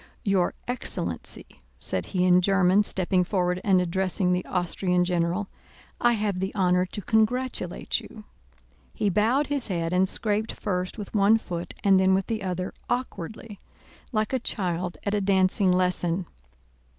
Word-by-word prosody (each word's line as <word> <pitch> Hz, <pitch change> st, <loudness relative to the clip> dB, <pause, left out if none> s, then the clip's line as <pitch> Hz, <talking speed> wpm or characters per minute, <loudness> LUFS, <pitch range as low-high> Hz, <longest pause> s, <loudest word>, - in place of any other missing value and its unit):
"Your 195 Hz, -5 st, +1 dB
excellency," 245 Hz, +1 st, -4 dB, 0.3 s
said -, -, -3 dB
he 180 Hz, -2 st, 0 dB
in 180 Hz, 0 st, +5 dB
German, 195 Hz, +1 st, +4 dB
stepping 185 Hz, -2 st, +1 dB
forward 180 Hz, -1 st, 0 dB
and 190 Hz, -3 st, +4 dB
addressing 180 Hz, +1 st, 0 dB
the 180 Hz, 0 st, +1 dB
Austrian 180 Hz, 0 st, 0 dB
general, 175 Hz, +3 st, 0 dB, 0.5 s
"I 240 Hz, 0 st, +4 dB
have 205 Hz, -4 st, -1 dB
the 190 Hz, +2 st, -2 dB
honor 180 Hz, -2 st, +2 dB
to 205 Hz, +2 st, -7 dB
congratulate 220 Hz, -3 st, 0 dB
you." 215 Hz, -, -12 dB, 0.7 s
He 205 Hz, -, +1 dB
bowed 230 Hz, +9 st, +2 dB
his 285 Hz, -3 st, -1 dB
head 170 Hz, -3 st, -2 dB
and 185 Hz, +1 st, +3 dB
scraped 215 Hz, 0 st, -1 dB
first 185 Hz, -1 st, -3 dB
with 205 Hz, -2 st, -7 dB
one 210 Hz, +1 st, +5 dB
foot 175 Hz, -5 st, -6 dB
and 195 Hz, -2 st, +5 dB
then 190 Hz, 0 st, +4 dB
with 190 Hz, 0 st, 0 dB
the 220 Hz, -2 st, -3 dB
other, 185 Hz, -1 st, -3 dB, 0.2 s
awkwardly, 220 Hz, -3 st, -4 dB, 0.5 s
like 215 Hz, 0 st, -1 dB
a 260 Hz, -, +2 dB
child 180 Hz, -6 st, -2 dB
at 200 Hz, -, -1 dB
a 205 Hz, -, +1 dB
dancing 190 Hz, 0 st, +3 dB
lesson. 180 Hz, -1 st, +1 dB
190 Hz, 150 wpm, -26 LUFS, 180-210 Hz, 0.7 s, in